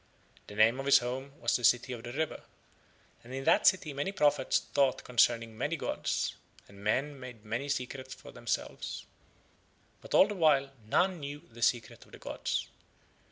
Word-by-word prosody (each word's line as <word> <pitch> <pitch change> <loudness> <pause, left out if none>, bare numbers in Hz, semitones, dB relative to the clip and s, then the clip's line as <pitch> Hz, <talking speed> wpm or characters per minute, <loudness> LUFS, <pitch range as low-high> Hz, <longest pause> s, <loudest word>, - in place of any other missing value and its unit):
The 105 - -10
name 110 +4 +4
of 135 - -4
his 140 - +8
home 130 +2 -5
was 120 0 +1
the 120 - -1
City 125 +2 +3
by 120 - -7
the 120 +1 -7
River, 155 +4 -2 0.8
and 120 - -13
in 135 - -4
that - - +4
city 165 -6 +3
many 145 +7 -2
prophets 145 -7 +2
taught 135 -3 +2
concerning 115 -2 +2
many 145 +9 -1
gods, - - -2 0.3
and 100 0 -14
men 135 +7 0
made 125 -4 -10
many 120 +6 -3
secrets 130 -1 -4
for - - -13
themselves, - - -4 1.0
but - - -4
all - - +7
the 210 - -4
while 150 -7 +3 0.2
none 180 - +2
knew 145 0 -7
the 120 +1 -12
Secret 120 -1 0
of - - -23
the - - -9
gods. - - -3
130 Hz, 175 wpm, -31 LUFS, 120-145 Hz, 1.0 s, his